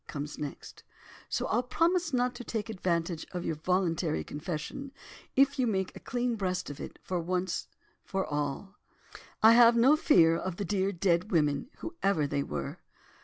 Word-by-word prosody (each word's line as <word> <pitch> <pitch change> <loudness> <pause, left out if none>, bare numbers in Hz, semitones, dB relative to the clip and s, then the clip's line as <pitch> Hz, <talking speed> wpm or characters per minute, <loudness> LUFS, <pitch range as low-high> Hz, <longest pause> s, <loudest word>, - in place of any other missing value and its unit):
comes 145 0 -6
next. 145 -2 -7 0.5
So - - -1
I'll 235 - +1
promise 330 +6 +1
not 250 -1 +1
to 245 0 -8
take 225 -1 -3
advantage 170 -4 -1
of 180 -1 -4
your - - 0
voluntary 165 - 0
confession, 155 - -5 0.4
if 275 +1 +4
you 250 - +3
make 190 -4 -1
a - - -8
clean 245 -1 -2
breast 185 -5 -2
of 145 - -10
it, - - -8
once 180 0 -1 0.4
for 190 -1 -2
all. 150 +7 -4 0.6
I 220 - +9
have 235 0 +7
no 255 +6 +6
fear 170 - +5
of 185 +1 -3
the 200 - -3
dear, 195 +1 0
dead 180 0 +1
women, 150 - +1
whoever 195 - 0
they 140 0 -1
were." 75 - -5
185 Hz, 165 wpm, -30 LUFS, 165-235 Hz, 0.6 s, I